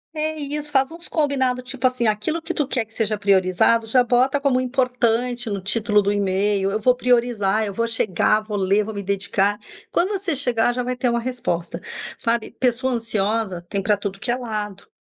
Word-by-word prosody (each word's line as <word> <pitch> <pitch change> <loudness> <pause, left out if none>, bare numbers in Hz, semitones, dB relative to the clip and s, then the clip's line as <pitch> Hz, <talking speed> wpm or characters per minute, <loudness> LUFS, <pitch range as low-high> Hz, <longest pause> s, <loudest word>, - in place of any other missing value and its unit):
É 310 0 0
isso, 295 +1 -1
faz 270 -2 +3
uns 335 +1 -7
combinados, 260 -5 +1
tipo 265 -1 -3
assim, 255 -2 +2
aquilo 215 +10 0
que - - -4
tu 295 - -1
quer 250 -5 0
que 225 - -24
seja 215 -1 -1
priorizado, 195 +3 +3
já 245 +3 +3
bota 255 +3 +2
como 275 -3 +2
importante 245 -2 0
no 200 -2 -3
título 210 +1 +2
do 200 0 0
email, 195 0 0
"eu 215 - -1
vou 250 +3 +3
priorizar, 235 -4 +1
eu 200 - -5
vou 230 +4 0
chegar, 215 -1 +1
vou 215 -1 -5
ler, 195 +2 +2
vou 220 +1 -6
me 200 - -4
dedicar", 200 +1 0 0.3
quando 365 - +1
você 375 -5 -2
chegar, 245 -3 +1
já 250 - -2
vai 250 +1 -2
ter 250 0 0
uma 235 0 0
resposta. 175 -9 -3 0.4
Sabe, 230 -1 -1
pessoa 255 +1 +1
ansiosa 220 -4 -1
tem 200 -1 -2
pra 210 +1 +2
tudo 195 -1 -5
que 240 +2 0
é - - +3
lado, 210 -5 -5
230 Hz, 200 wpm, -22 LUFS, 205-255 Hz, 0.4 s, faz